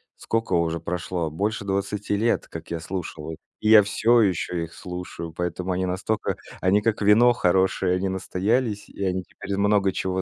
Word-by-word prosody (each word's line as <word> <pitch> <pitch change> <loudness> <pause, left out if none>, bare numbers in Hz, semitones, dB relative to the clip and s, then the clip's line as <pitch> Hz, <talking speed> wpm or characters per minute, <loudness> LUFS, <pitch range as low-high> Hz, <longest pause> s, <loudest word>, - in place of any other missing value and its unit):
сколько 115 0 -2
уже 85 -1 +1
прошло? 85 -1 -3
Больше 100 +4 -2
20 100 +1 -1
лет, 115 +2 +1
как 80 0 -9
я 85 - -2
слушал 80 -2 -5
их. 80 - -7 0.2
И 110 - 0
я 110 -2 +9
всё 115 +4 +3
ещё 90 -3 0
их 80 - -8
слушаю, 90 -2 -7
поэтому 90 +2 -3
они 95 +1 0
настолько 95 +4 -1 0.3
они 100 +3 +3
как 110 -1 0
вино 110 +4 +6
хорошее, 95 -2 +2
они 95 +1 -1
настоялись, 105 +4 -1
и 100 - -6
они 95 -1 -1
теперь 100 - -10
из 100 - 0
много 100 -1 +3
чего 95 0 -2
95 Hz, 180 wpm, -24 LUFS, 90-105 Hz, 0.3 s, я